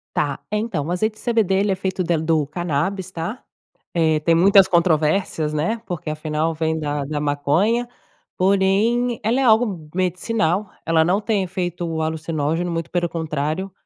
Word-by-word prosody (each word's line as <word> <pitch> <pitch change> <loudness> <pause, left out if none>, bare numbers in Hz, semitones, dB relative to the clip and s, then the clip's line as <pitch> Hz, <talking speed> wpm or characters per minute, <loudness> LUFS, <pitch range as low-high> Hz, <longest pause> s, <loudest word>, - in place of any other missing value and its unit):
Tá. 145 -2 0
Então, 210 -8 -1
o - - -2
azeite 215 +5 0
de - - -15
CBD, 225 -6 +2
ele 200 +1 +2
é - - +1
feito 190 0 -2
del 165 -2 0
do 160 -2 +1
canábis, 175 +4 -2
tá? 175 +8 -5 0.5
Eh, 160 -2 +2
tem 165 +2 +3
muitas 195 +2 +6
controvérsias, 160 -2 +1
né? 170 +10 -1
Porque 175 -5 -5
afinal, 155 +1 -1
vem 160 0 -1
da 145 -2 -2
da 150 +1 -3
maconha, 155 +12 +1 0.5
porém 200 +6 +2
ela 230 +5 +1
é - - +2
algo 215 -9 +2
medicinal, 185 +1 0 0.2
ela 160 -1 +3
não 190 +5 +2
tem 210 -3 0
efeito 175 -3 -3
alucinógeno, 160 +1 -1
muito 165 0 -4
pelo 175 -1 0
contrário, 160 +3 -3
175 Hz, 160 wpm, -21 LUFS, 155-195 Hz, 0.5 s, muitas